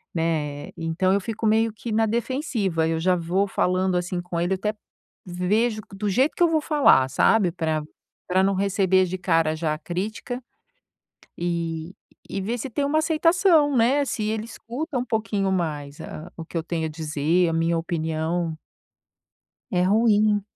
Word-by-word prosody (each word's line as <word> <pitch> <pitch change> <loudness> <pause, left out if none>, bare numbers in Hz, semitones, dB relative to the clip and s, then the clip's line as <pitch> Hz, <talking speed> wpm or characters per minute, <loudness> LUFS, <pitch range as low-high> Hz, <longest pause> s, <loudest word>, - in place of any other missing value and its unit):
né, 155 -3 -1
então 165 +3 0
eu 200 - +2
fico 225 +2 -4
meio 220 +1 +3
que 225 +2 -6
na 225 +1 +3
defensiva, 225 - -1
eu 165 0 0
já 180 +2 +2
vou 180 +4 0
falando 185 -1 +1
assim 175 0 -1
com 175 -1 -3
ele, 175 +3 +1
até 210 +3 -2 0.5
vejo 210 +5 0
do 205 +1 -2
jeito 260 +9 +3
que - - -8
eu - - +6
vou 315 -1 +2
falar, 290 - +4
sabe, 185 +7 +3
pra 160 -3 -1 0.4
pra 185 +1 +2
não 195 0 +2
receber 190 -1 +2
de 185 +1 -4
cara 165 -3 +2
já 155 -1 -1
a - - -8
crítica 215 - -4 1.0
e 170 0 -3 0.3
e 195 - -3
ver 225 +6 -2
se 260 - -5
tem 280 +5 -1
uma 305 +2 +2
aceitação, 320 -2 +3
né, 250 +5 +3
se 220 - -3
ele 215 0 -2
escuta 255 +6 -5
um 245 - -1
pouquinho 215 -4 -1
mais 150 -5 -3
a 165 +3 -8
o 165 - -6
que 170 - -9
eu 165 - 0
tenho 165 -2 -2
a - - -2
dizer, 155 +2 0
a - - -2
minha 165 +1 +1
opinião. 160 0 -2 1.1
É 180 -1 +2
ruim, 210 +1 +3
185 Hz, 170 wpm, -24 LUFS, 165-225 Hz, 1.1 s, eu